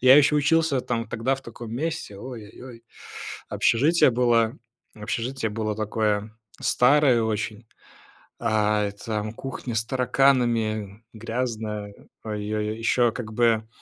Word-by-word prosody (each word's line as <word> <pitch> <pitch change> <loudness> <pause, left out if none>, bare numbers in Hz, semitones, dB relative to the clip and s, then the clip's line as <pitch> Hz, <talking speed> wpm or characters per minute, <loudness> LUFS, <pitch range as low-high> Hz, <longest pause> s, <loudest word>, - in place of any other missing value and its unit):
я 130 +2 +8
еще 150 +1 +5
учился, 150 -2 +2
там, 115 -2 -3
тогда 120 +4 0
в 135 - -9
таком 115 -1 -9
месте, 155 -7 -3
ой 120 -2 -8
ой - - -13
ой. 120 -3 -11 0.6
Общежитие 145 +5 +3
было 120 0 +2 0.4
общежитие 115 +2 -3
было 110 0 -2
такое 105 0 -1 0.3
старое 130 -2 +4
очень, 110 +1 -3 0.8
э, 105 -2 +2
и - - -8
там 110 -1 -2
кухня 130 -2 -6
с 110 +1 0
тараканами, 120 -5 +1
грязная, 110 -3 -4 0.3
ой 105 -1 -4
ой 105 0 -1
ой. 110 - -5
Ещё 120 +1 +3
как 110 -3 -6
бы, 110 -1 +2
115 Hz, 135 wpm, -25 LUFS, 110-125 Hz, 0.8 s, я